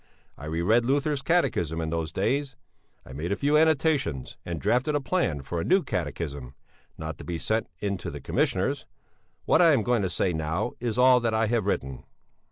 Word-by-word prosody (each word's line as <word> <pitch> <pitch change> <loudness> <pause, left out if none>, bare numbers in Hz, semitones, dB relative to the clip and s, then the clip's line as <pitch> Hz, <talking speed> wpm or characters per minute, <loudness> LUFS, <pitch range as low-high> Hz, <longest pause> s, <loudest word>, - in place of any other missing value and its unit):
I 75 - -10
reread 85 +10 +2
Luther's 140 +3 0
Catechism 90 - +1
in 80 -1 -2
those 80 -1 -2
days; 135 - -1 0.5
I 65 - -11
made 80 +7 -4
a - - +2
few 145 +7 +1
annotations, 155 - +2
and 85 -2 -4
drafted 125 - +1
a - - +2
plan 135 - -1
for 85 +4 -3
a - - -2
new 190 0 +3
Catechism. 70 -5 -4 0.4
(Not 80 0 -6
to - - -8
be 85 -1 -4
sent 110 +6 -1
in 100 -1 -2
to 85 0 -6
the 75 -3 -7
Commissioners; - - 0 0.6
what 160 - +4
I 165 -3 +6
am 115 - +2
going 120 -1 +1
to 95 - -1
say 90 0 0
now 80 +7 -2
is 115 -2 -2
all 125 0 +6
that 115 -2 0
I 110 +1 +2
have 110 -2 0
written.) 65 -9 -2
105 Hz, 195 wpm, -26 LUFS, 80-135 Hz, 0.6 s, I